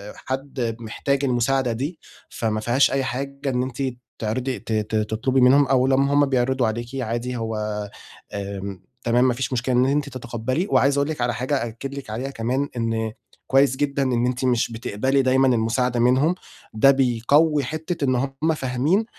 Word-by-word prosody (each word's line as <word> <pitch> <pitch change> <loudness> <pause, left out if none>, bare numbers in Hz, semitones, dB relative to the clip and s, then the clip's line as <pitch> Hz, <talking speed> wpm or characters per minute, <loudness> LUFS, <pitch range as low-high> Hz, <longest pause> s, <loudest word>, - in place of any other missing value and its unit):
حد 130 -3 -3
محتاج 135 +5 -2
المساعدة 125 0 +1
دي، 140 +9 -4 0.3
فما 110 -2 -2
فيهاش 120 +5 +3
أي 135 -1 +1
حاجة 140 +2 -3
إن 125 -1 0
أنتِ 130 +1 -5 0.4
تعرضي 125 +3 -2
ت 115 - -9
ت 110 0 -1
تطلبي 110 +5 +1
منهم 135 +3 +6
أو 130 -1 +3
لمّا 135 +1 +3
هم 145 0 +5
بيعرضوا 130 -2 +1
عليكِ 115 +2 -3
عادي 120 +2 -3
هو 105 -2 -3 0.4
آمم، 100 -2 -5 0.2
تمام 120 +2 +3
ما 125 - +2
فيش 130 +2 -3
مشكلة 125 +1 0
إن 125 +1 +4
أنت 140 +1 0
تتقبّلي 130 - -3
وعايز 140 +1 +3
أقول 140 +1 +1
لِك 155 -5 -3
على 120 0 +1
حاجة 130 +4 -1
أأكد 120 +4 -6
لِك 140 -5 -8
عليها 120 +5 -3
كمان، 130 +4 -1
إن 115 -1 -1 0.4
كويس 135 0 +4
جدًا 140 0 0
إن 125 -2 +1
أنتِ 125 +1 -1
مش 120 -2 +1
بتقبلي 125 +4 0
دايمًا 130 0 +3
المساعدة 120 +1 +1
منهم، 130 +8 +3 0.4
ده 125 +6 +6
بيقوِّي 140 +4 +3
حتة 155 +3 -3
إن 130 -1 +2
هم 135 +5 0
فاهمين 140 - +1
130 Hz, 170 wpm, -23 LUFS, 115-135 Hz, 0.4 s, منهم